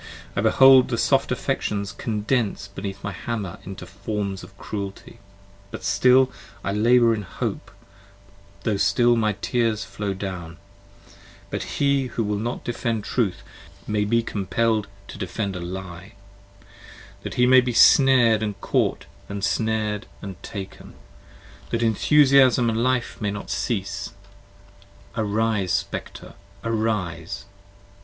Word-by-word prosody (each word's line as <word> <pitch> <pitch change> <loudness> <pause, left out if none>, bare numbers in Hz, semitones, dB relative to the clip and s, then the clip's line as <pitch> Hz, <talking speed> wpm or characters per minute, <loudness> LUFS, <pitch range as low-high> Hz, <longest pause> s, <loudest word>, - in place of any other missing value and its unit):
I 100 - +1
behold 130 +4 +7
the 120 - -2
soft - - +2
affections 100 -1 -2
Condense 110 -1 -1
beneath 100 0 -7
my 100 - -3
hammer 105 -5 -5
into 95 -1 -8
forms 100 +1 -4
of 100 - -14
cruelty, 100 -2 -7 0.5
But - - -8
still 125 +6 +4 0.3
I 100 - -1
labour 115 +3 +4
in 110 - -2
hope, 90 - -5 0.9
tho' 105 -3 0
still 120 +4 +3
my 110 -2 +1
tears 115 -4 0
flow 100 0 -4
down, 95 -4 -6 0.9
That - - -4
he 140 -2 +2
who 120 - -2
will 105 -1 -1
not 120 +3 -3
defend 115 -2 -2
Truth, 110 -6 -1 0.4
may 105 0 0
be 115 +3 +2
compell'd 110 +1 0 0.2
to - - -10
defend 100 +1 -3
30 90 -2 -5
A - - -6
Lie, 95 +1 -8 1.1
that - - -6
he 125 - +4
may 130 +1 +7
be 125 0 -2
snared 120 -2 +6
and 105 -2 -3
caught - - 0 0.2
and 100 -1 -5
snared 110 -1 -1
and 95 -2 -8
taken, 100 -2 -8 0.7
That 115 0 -1
Enthusiasm 130 +1 +4
and 110 +1 -1
Life 130 -2 -1
may 105 - 0
not 100 0 -5
cease: 100 -1 -3 1.0
arise 110 -3 0
Spectre - - -4 0.3
arise! 100 -6 -2
105 Hz, 130 wpm, -23 LUFS, 100-115 Hz, 1.1 s, behold